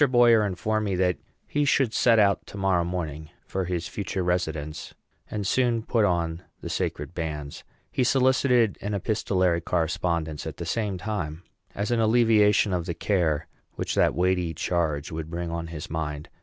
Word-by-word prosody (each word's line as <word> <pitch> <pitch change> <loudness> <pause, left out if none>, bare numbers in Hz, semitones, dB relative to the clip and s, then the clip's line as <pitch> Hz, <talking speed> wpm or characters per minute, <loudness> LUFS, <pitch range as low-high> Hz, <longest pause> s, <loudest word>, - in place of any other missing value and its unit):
Boyer 120 -3 +6
informed 105 +2 -1
me 100 -2 0
that 90 -4 +1 0.3
he 145 - 0
should 135 -4 +2
set 115 0 +4
out 100 -2 +3
to 100 - -9
morrow 95 -3 +2
morning 80 -3 -4 0.2
for 95 -1 -2
his 90 -1 -2
future 95 -3 -3
residence, 80 -4 -2 0.3
and 105 -2 -3
soon 120 +1 +1
put 115 -2 +2
on 85 -2 0 0.2
the - - -6
sacred - - -3
bands. 75 -4 -5 0.3
He 130 - +1
solicited 125 -3 +3
an 105 +1 -2
epistolary 95 -4 +1
correspondence, 85 -2 -1
at - - -6
the - - -5
same 105 -4 -1
time, 90 -5 -4 0.3
as 105 +4 -2
an 120 - +2
alleviation 110 -3 +4
of 90 -1 -1
the 85 - -2
care 80 -6 +1 0.3
which - - -2
that - - +3
weighty 90 -1 +1
charge 80 -4 -1
would 80 0 -5
bring 85 0 -4
on 85 0 -3
his 80 -2 -7
mind. 75 -2 -4
90 Hz, 170 wpm, -26 LUFS, 80-110 Hz, 0.3 s, Boyer